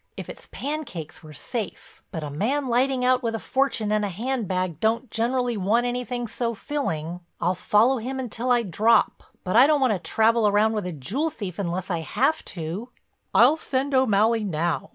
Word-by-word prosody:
If - - -7
it's - - -9
pancakes 275 - -5
we're 155 -1 -12
safe, 205 - -6
but 160 - -5
a 145 - -5
man 260 - -1
lighting 250 +1 +2
out 255 0 +3
with 230 -2 -1
a - - -3
fortune 260 -6 0
in 215 0 +2
a 205 - -1
handbag 185 - -2
don't 225 +3 0
generally 240 +1 0
want 215 +5 +2
anything 245 0 -2
so 235 +1 -3
filling. 175 - -3 0.2
I'll 180 - +1
follow 220 +8 +3
him 260 +4 -4
until 245 0 -3
I 240 -1 +4
drop, 215 +4 +2 0.2
but 185 - -2
I 250 +4 +8
don't 300 -1 +3
want 260 -5 +3
to 190 - -2
travel 220 +5 +3
round 215 +2 +3
with 210 -4 -2
a - - -3
jewel 200 - -2
thief 200 - -7
unless 185 0 -3
I 170 - 0
have 270 - 0
to." 175 +8 -5 0.5
"I'll 310 - +7
send 275 -2 -1
O'Malley 225 -3 +3
now. 170 -3 -1
225 Hz, 190 wpm, -24 LUFS, 185-255 Hz, 0.5 s, I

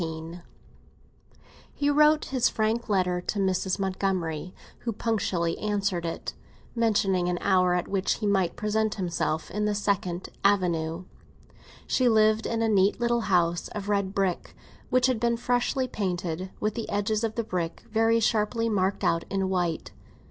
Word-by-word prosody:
XIV 165 +1 -5 1.3
HE 285 0 +1
wrote 300 +1 +4
his 255 -3 +1
frank 220 +2 -1
letter 180 -3 +1
to 205 - -3
Mrs. 190 -1 0
Montgomery, 185 -4 -2 0.3
who 230 - -3
punctually 195 -7 -1
answered 200 -5 -1
it, 165 - -5 0.4
mentioning 200 -6 +1
an 175 - 0
hour 185 -2 +3
at 180 - -1
which 195 -1 0
he 215 - -4
might 190 -4 +1
present 215 0 0
himself 170 -4 -2
in 210 +1 -1
the 210 -1 0
Second 190 -3 -1
Avenue. 175 -4 +1 0.8
She 255 -2 +2
lived 215 0 +3
in 230 -1 -1
a - - +2
neat 200 -1 +3
little 240 0 +1
house 175 -2 +2
of 205 -1 -4
red 200 -1 0
brick, 190 -3 -1 0.3
which 255 0 +3
had 255 -3 +1
been 235 0 +1
freshly 245 +2 0
painted, 185 -5 -3
with 215 0 0
the 230 - -5
edges 210 +2 0
of 220 -1 -1
the 230 - -1
bricks 175 -5 -3
very 225 0 +3
sharply 230 +1 +1
marked 195 -2 0
out 165 0 +2
in 195 -1 -1
white. 175 -3 -1
200 Hz, 155 wpm, -27 LUFS, 180-225 Hz, 1.3 s, wrote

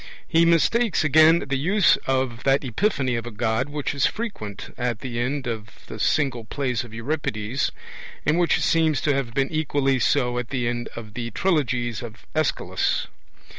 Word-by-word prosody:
He 165 +1 +4
mistakes, 180 +5 +3
again, 155 +3 +5
the 135 0 -1
use 185 +6 +4
of 130 -2 0
that 135 +1 +3
epiphany 130 - 0
of 115 0 -5
a 110 -3 -9
God 110 +3 0
which 145 -2 -3
is 140 - +2
frequent 155 - -6
at 120 -2 -2
the 120 -3 -4
end 135 +3 -1
of 110 -3 -4 0.2
the 110 - -9
single 135 -2 +1
plays 125 +1 -2
of 120 - -12
Euripides, 115 -1 -2 0.5
and 155 +4 +3
which 175 - +2
seems 160 -4 +2
to 145 - +2
have 130 -4 -2
been 135 0 +1
equally 145 -4 +1
so 125 0 +1
at 125 - -5
the 125 -4 -1
end 120 0 -3
of 110 -2 -8
the 120 0 -4
trilogies 125 - 0
of 115 -2 -10
Aeschylus. 155 -2 0
130 Hz, 170 wpm, -24 LUFS, 120-155 Hz, 0.5 s, again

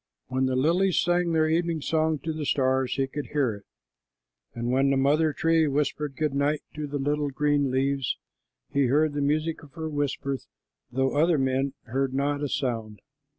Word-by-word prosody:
When 130 0 +1
the 130 - 0
lilies 170 +7 +3
sang 175 0 +2
their 160 -1 +3
evening 165 0 +1
song 160 +1 +1
to 160 - -2
the 155 -1 -4
stars, 130 -2 +1
he 135 0 +1
could 145 +2 -6
hear 140 -6 +2
it, 100 - -18 0.9
and 120 +1 -2
when 135 +2 +3
the 135 - +2
mother 150 +4 +3
tree 160 +1 +2
whispered 145 0 -1
"Good 150 0 -1
night" 145 +2 0
to 150 -1 -4
the 145 0 -3
little 145 +1 0
green 145 0 +1
leaves, 135 0 0 0.5
he 140 -2 +2
heard 150 +4 +2
the 145 - -1
music 155 +3 0
of 145 -3 -16
her 160 -1 -4
whisper, 140 -2 -2 0.5
though 135 +1 +1
other 160 +2 +4
men 135 0 0
heard 135 +2 -1
not 145 +1 0
a 145 - -1
sound. 115 -6 -2
145 Hz, 185 wpm, -26 LUFS, 135-155 Hz, 0.9 s, other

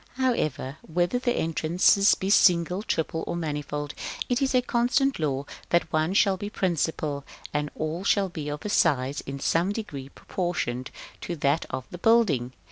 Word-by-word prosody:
§ - - -26
VII. 265 - -1
However, 155 - 0
whether 175 +7 0
the 245 -1 +1
entrances 170 +5 +3
be 190 +1 -2
single, 180 0 +4
triple, 160 -5 -2
or - - -2
manifold, 150 -2 -3 0.4
it 245 +2 +1
is 265 -1 +1
a 250 - +4
constant 250 +2 +1
law 140 -3 -1 0.2
that 170 -2 +1
one 155 +4 +1
shall 195 -2 +4
be 205 +2 -5
principal, 160 -7 -1 0.3
and 150 0 -1
all 155 +4 -3
shall 200 -1 +2
be 155 -4 -5
of 150 0 -5
size 140 -7 +2
in 140 0 -5
some 170 +7 +1
degree 145 -11 -6
proportioned 140 -9 -3 0.3
to 175 - -4
that 145 +1 +1
of 130 -1 -4
the 175 - -8
building. 180 - +3
165 Hz, 170 wpm, -26 LUFS, 145-200 Hz, 0.4 s, single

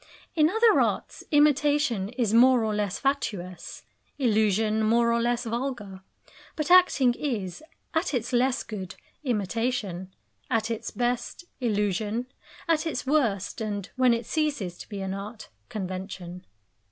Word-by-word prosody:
In 310 -1 +4
other 445 +3 +4
arts - - -2
imitation 290 -7 +3
is 235 -3 -1
more 245 0 +6
or 215 -1 0
less 205 -3 -1
fatuous, 185 -11 -3 0.3
illusion 220 -3 +2
more 235 +2 +3
or 235 - +1
less 240 0 0
vulgar. 230 -5 -4 0.5
But 305 +2 -2
acting 355 -9 +6
is, 225 - -3 0.3
at 325 +3 0
its 245 -2 -2
less 250 +1 +2
good, 195 -5 -7 0.3
imitation; 210 -5 -2 0.4
at 225 0 0
its 225 - -3
best, 245 +7 -2
illusion; 210 0 0 0.4
at 330 0 +2
its 260 -6 -3
worst, 240 -10 0
and 205 -3 -4
when 255 -2 +4
it 230 -1 -4
ceases 285 - -1
to - - -10
be 200 -2 -5
an 190 0 -3
art, 210 +3 -7 0.2
convention. 185 -2 -6
230 Hz, 135 wpm, -27 LUFS, 205-260 Hz, 0.5 s, more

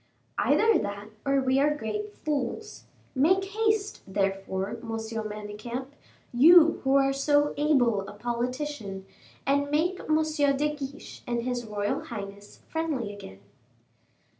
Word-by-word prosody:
"Either 450 0 +4
that 200 +1 -5 0.2
or 275 0 +3
we 260 0 +2
are 295 +1 +3
great 420 - -4
fools. 300 - -3 0.3
Make 365 +8 +3
haste, 430 0 0
therefore, 195 0 -1
M. 235 - -5
Manicamp, 220 +2 -5 0.4
you 320 +6 +7
who 270 0 +3
are 275 0 +4
so 290 +1 +2
able 245 -9 +2
a - - -8
politician, 240 -2 -3 0.4
and 285 +1 +2
make 340 +5 +1
M. 310 - +1 0.4
de 300 +1 0
Guiche 280 0 -8
and 240 -1 -1
his 245 -1 -2
royal 205 -1 -2
highness 200 -2 -8
friendly 295 -10 -2
again." 95 - -11
260 Hz, 125 wpm, -27 LUFS, 210-300 Hz, 0.4 s, you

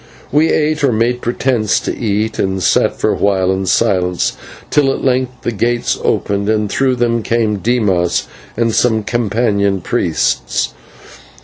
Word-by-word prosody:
We 155 +3 +3
ate, 150 -1 0
or 135 - +4
made 120 +2 0
pretence 120 -3 0
to - - -3
eat, 110 -1 -2
and 95 -1 -1
sat - - +2
for - - +1
a - - 0
while 95 -2 +1
in 95 0 -2
silence, 90 -4 +1 0.4
till 140 -2 +3
at - - -4
length 125 -1 -1
the - - -1
gates 120 +2 0
opened, 100 +1 0
and 105 -1 +1
through 130 -1 +1
them 120 -1 0
came 110 -2 0
Dimas 100 -6 +1 0.3
and 115 -1 +1
some 110 -2 +2
companion 105 -3 0
priests. 85 - -1
110 Hz, 150 wpm, -15 LUFS, 100-125 Hz, 0.4 s, or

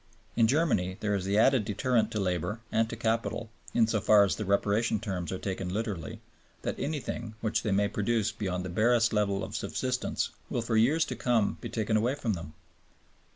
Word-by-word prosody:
In 115 -2 +4
Germany 120 - +1
there 105 -1 0
is 95 -2 -1
the 100 +2 +1
added 130 +1 +4
deterrent 115 +3 +1
to 110 - -3
labor 95 +3 -1
and 115 0 +2
to - - -4
capital 115 0 -1 0.2
(in 115 - +4
so 110 -1 0
far 105 0 +6
as 100 - +1
the 105 - -4
Reparation 105 +3 +1
terms 90 -4 -4
are 95 - -2
taken 95 -1 -4
literally), 100 -5 -4 0.4
that - - -3
anything, 130 -6 -4
which 110 0 0
they - - -2
may 100 +1 +3
produce 110 +1 0
beyond 95 -5 -3
the - - -4
barest 115 +4 +3
level 100 -2 +1
of - - -6
subsistence, 125 -1 -2 0.2
will 120 - -1
for 115 -1 -1
years 140 +9 +4
to - - -5
come 115 -5 +1
be - - -5
taken 110 -1 0
away 120 +5 +1
from 115 -6 -1
them. 85 -4 -7
110 Hz, 200 wpm, -29 LUFS, 100-115 Hz, 0.4 s, far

